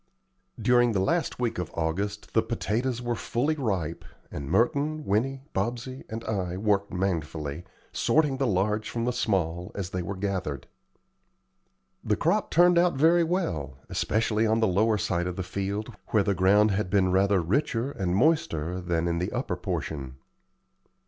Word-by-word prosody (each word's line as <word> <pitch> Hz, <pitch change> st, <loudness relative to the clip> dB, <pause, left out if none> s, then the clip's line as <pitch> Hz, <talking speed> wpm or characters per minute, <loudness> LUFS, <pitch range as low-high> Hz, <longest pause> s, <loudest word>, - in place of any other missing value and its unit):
During 120 Hz, -1 st, +4 dB
the 100 Hz, -, +1 dB
last 165 Hz, -, 0 dB
week 120 Hz, -6 st, -1 dB
of 90 Hz, -, -3 dB
August 100 Hz, +6 st, -2 dB
the -, -, +4 dB
potatoes 120 Hz, +4 st, -2 dB
were 120 Hz, 0 st, 0 dB
fully 120 Hz, +7 st, 0 dB
ripe, 95 Hz, -, -2 dB, 0.3 s
and 70 Hz, -2 st, -6 dB
Merton, 145 Hz, -, +1 dB
Winnie, 130 Hz, +7 st, 0 dB
Bobsey, 120 Hz, +6 st, -3 dB
and 115 Hz, +1 st, -5 dB
I 95 Hz, -5 st, -2 dB
worked 100 Hz, 0 st, +1 dB
manfully, 80 Hz, -4 st, -2 dB, 0.3 s
sorting 150 Hz, -4 st, +2 dB
the 135 Hz, -1 st, +1 dB
large 105 Hz, +2 st, 0 dB
from 115 Hz, 0 st, -2 dB
the 125 Hz, -, 0 dB
small, 90 Hz, -7 st, -1 dB
as 95 Hz, -2 st, -4 dB
they 90 Hz, -, -2 dB
were 100 Hz, +3 st, -4 dB
gathered. 95 Hz, -7 st, -3 dB, 1.4 s
The -, -, +1 dB
crop -, -, +1 dB
turned 175 Hz, +1 st, +5 dB
out 175 Hz, -2 st, +3 dB
very 165 Hz, +5 st, +5 dB
well, 85 Hz, -, -2 dB
especially 110 Hz, 0 st, +1 dB
on 110 Hz, +1 st, +2 dB
the 115 Hz, -, +3 dB
lower 105 Hz, +4 st, +2 dB
side 85 Hz, -2 st, -1 dB
of 90 Hz, -, -3 dB
the 95 Hz, -, -3 dB
field, 100 Hz, +5 st, -3 dB
where 105 Hz, -2 st, +2 dB
the 100 Hz, -, +1 dB
ground 100 Hz, +3 st, +4 dB
had 100 Hz, -1 st, -1 dB
been 95 Hz, -1 st, +3 dB
rather 100 Hz, +1 st, +3 dB
richer 115 Hz, -, 0 dB
and 95 Hz, -8 st, -1 dB
moister 100 Hz, -, +1 dB
than 85 Hz, -1 st, 0 dB
in 85 Hz, 0 st, 0 dB
the 90 Hz, -, -2 dB
upper -, -, -2 dB
portion. 65 Hz, -4 st, -4 dB
100 Hz, 160 wpm, -27 LUFS, 90-120 Hz, 1.4 s, turned